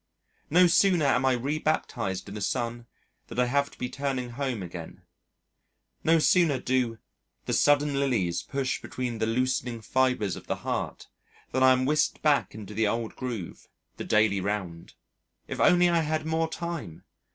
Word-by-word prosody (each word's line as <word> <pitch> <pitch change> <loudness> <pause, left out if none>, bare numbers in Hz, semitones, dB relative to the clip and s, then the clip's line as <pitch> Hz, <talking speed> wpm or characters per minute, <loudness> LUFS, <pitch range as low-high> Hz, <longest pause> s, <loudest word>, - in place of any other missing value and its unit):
No 180 +4 +6
sooner 175 -2 +4
am 130 -1 +2
I 130 - +4
rebaptized 125 -7 -2
in - - -8
the 105 - -6
sun 120 +2 -2 0.4
than - - -9
I 125 - +3
have 140 +3 +1
to - - -18
be 125 - -3
turning 130 -2 -3
home 125 -5 -3
again. 85 -2 -9 1.0
No 165 +1 +4
sooner 160 -2 +3
do 125 -3 0 0.5
"the - - -2
sudden 145 0 +3
lilies 105 -11 0
push 135 -1 -2
between 125 -3 -4
the 110 - 0
loosening 125 0 -1
fibres 125 -4 0
of - - -11
the - - -1
heart" - - -3 0.4
than 130 - 0
I 130 0 +7
am 130 0 +2
whisked 150 +2 +1
back 150 -7 +2
into 105 -1 -8
the 110 +1 +1
old 115 +1 -2
groove 120 -9 -6 0.3
the - - -4
daily 105 -2 +2
round. 95 -4 -4 0.5
If - - -5
only 180 0 +5
I 170 -1 +3
had 155 0 -1
more 160 0 0
time! 165 - -6
130 Hz, 165 wpm, -27 LUFS, 110-145 Hz, 1.0 s, I